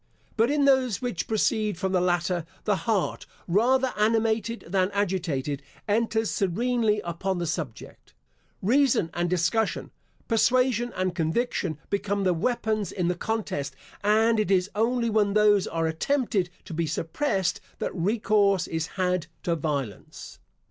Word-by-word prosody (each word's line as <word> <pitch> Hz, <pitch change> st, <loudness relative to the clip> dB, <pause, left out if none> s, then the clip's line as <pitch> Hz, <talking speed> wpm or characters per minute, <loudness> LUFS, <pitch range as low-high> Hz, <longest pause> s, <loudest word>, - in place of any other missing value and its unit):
But 230 Hz, +2 st, +3 dB
in 290 Hz, -1 st, +2 dB
those 260 Hz, -6 st, +3 dB
which 245 Hz, -9 st, -3 dB
proceed 215 Hz, -2 st, +1 dB
from 190 Hz, +1 st, -1 dB
the 185 Hz, -2 st, +2 dB
latter, 175 Hz, -1 st, +1 dB, 0.2 s
the 210 Hz, -, +2 dB
heart, 215 Hz, -5 st, 0 dB, 0.2 s
rather 255 Hz, +8 st, +2 dB
animated 225 Hz, +1 st, +1 dB
than 185 Hz, +1 st, +1 dB
agitated, 170 Hz, -9 st, -1 dB, 0.3 s
enters 225 Hz, +1 st, +1 dB
serenely 215 Hz, +2 st, +1 dB
upon 175 Hz, +3 st, -2 dB
the 175 Hz, -, -2 dB
subject. 160 Hz, -7 st, -6 dB, 0.5 s
Reason 240 Hz, -, +3 dB
and 175 Hz, 0 st, -1 dB
discussion, 180 Hz, +6 st, 0 dB, 0.4 s
persuasion 240 Hz, +1 st, +2 dB
and 185 Hz, -1 st, -1 dB
conviction, 170 Hz, -, -1 dB
become 200 Hz, 0 st, 0 dB
the 185 Hz, -1 st, +3 dB
weapons 215 Hz, +2 st, -1 dB
in 175 Hz, -2 st, -1 dB
the 180 Hz, -, 0 dB
contest, 175 Hz, -10 st, -3 dB, 0.3 s
and 220 Hz, +2 st, +3 dB
it 210 Hz, -, 0 dB
is 190 Hz, 0 st, +2 dB
only 235 Hz, +2 st, +1 dB
when 210 Hz, -2 st, +2 dB
those 210 Hz, -2 st, +4 dB
are 165 Hz, 0 st, -1 dB
attempted 195 Hz, -, 0 dB, 0.2 s
to -, -, -8 dB
be 165 Hz, 0 st, -1 dB
suppressed 180 Hz, -, -1 dB, 0.2 s
that -, -, -3 dB
recourse 200 Hz, 0 st, +2 dB
is 165 Hz, 0 st, -3 dB
had 180 Hz, -3 st, 0 dB, 0.2 s
to 170 Hz, -, +1 dB
violence. 140 Hz, -8 st, -5 dB
200 Hz, 140 wpm, -26 LUFS, 175-225 Hz, 0.5 s, those